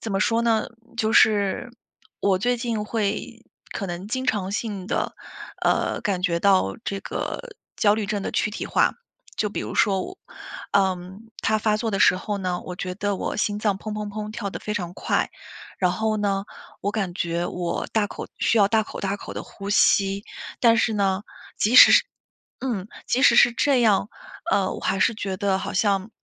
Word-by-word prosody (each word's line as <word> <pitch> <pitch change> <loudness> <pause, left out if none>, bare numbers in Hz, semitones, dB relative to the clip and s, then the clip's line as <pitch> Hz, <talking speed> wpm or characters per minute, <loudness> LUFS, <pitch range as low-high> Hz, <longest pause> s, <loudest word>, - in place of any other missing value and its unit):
怎 220 - -4
么 195 - 0
说 230 +3 +2
呢， 225 -2 +2 0.3
就 220 -2 0
是 210 +2 +3 0.5
我 195 -2 +2
最 245 +5 +1
近 230 -3 -2
会， 210 -2 -3 0.3
可 200 - -4
能 175 +2 -5
经 260 +4 -3
常 200 -5 0
性 205 -3 -3
地， - - -2 0.5
呃， - - +1
感 185 -3 -1
觉 170 -3 +1
到 185 - +3
这 195 0 -3
个 470 - -5 0.2
焦 205 -1 +4
虑 215 -2 -2
症 205 -1 -2
的 - - -3
躯 - - 0
体 210 - -5
化。 - - +2 0.4
就 210 - 0
比 205 - -4
如 - - -5
说 195 -3 +2
我 380 - -9 0.5
嗯， 190 0 0 0.2
它 220 -1 +1
发 210 0 +1
作 225 0 -1
的 195 - -1
时 185 - +5
候 205 +2 -3
呢， 180 -2 -2
我 180 -1 -8
觉 180 0 -4
得 205 0 -1
我 - - -3
心 210 0 0
脏 205 -3 0
“砰 215 - -5
砰 210 -1 -4
砰” 210 +1 -5
跳 205 -2 -4
得 - - -7
非 210 - -4
常 175 -5 -3
快， - - 0 0.5
然 180 -2 +2
后 215 +3 -1
呢， 195 -1 0 0.4
我 205 - -1
感 195 -5 -2
觉 170 -1 -1
我 175 -1 -3
大 215 -2 +2
口 - - -8
需 230 - +2
要 200 -1 +5
大 220 0 +3
口 - - -8
大 195 0 -1
口 - - -9
地 - - -4
呼 200 0 -8
吸。 195 0 +3 0.4
但 230 -2 +5
是 225 -1 +2
呢， 195 -1 0 0.3
即 220 +4 +1
使 250 - +10
是 - - +6 0.6
嗯， 220 -7 -3 0.2
即 255 - +1
使 285 - +6
是 240 - +7
这 260 0 +2
样， 205 -2 +3 0.4
嗯， 195 -2 +2
我 - - -8
还 195 - 0
是 225 - +3
觉 195 -3 -4
得 195 -1 +1
好 - - -5
像 195 +1 +1
205 Hz, 215 characters per minute, -24 LUFS, 190-220 Hz, 0.6 s, 使